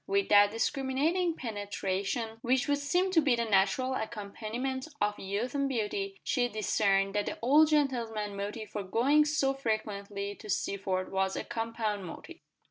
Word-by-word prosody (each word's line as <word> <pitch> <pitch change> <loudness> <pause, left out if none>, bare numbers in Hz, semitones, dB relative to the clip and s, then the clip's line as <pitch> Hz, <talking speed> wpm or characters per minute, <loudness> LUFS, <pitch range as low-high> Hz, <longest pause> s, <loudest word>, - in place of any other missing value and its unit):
With 200 0 +1
that 205 0 +7
discriminating 275 - 0
penetration 205 0 -3
which 255 +1 +1
would 285 0 +2
seem 355 +7 +1
to 335 -3 +5
be 275 -5 +3
the 235 0 -1
natural 215 +6 +2
accompaniment 235 +4 -4
of 205 0 0
youth 205 +6 -3
and 280 -1 0
beauty, 390 - -2
she 245 -3 +1
discerned 195 -2 +1
that 205 0 0
the - - -3
old 295 +6 +6
gentleman's 230 -8 0
motive 205 +2 -5
for 205 - -3
going 260 +10 +3
so 285 -2 +1
frequently 205 -5 -3
to 215 +1 -12
Sealford 190 -1 -1
was 190 0 0
a - - -3
compound 225 -3 -3
motive. 330 - -9
225 Hz, 155 wpm, -30 LUFS, 200-270 Hz, -, that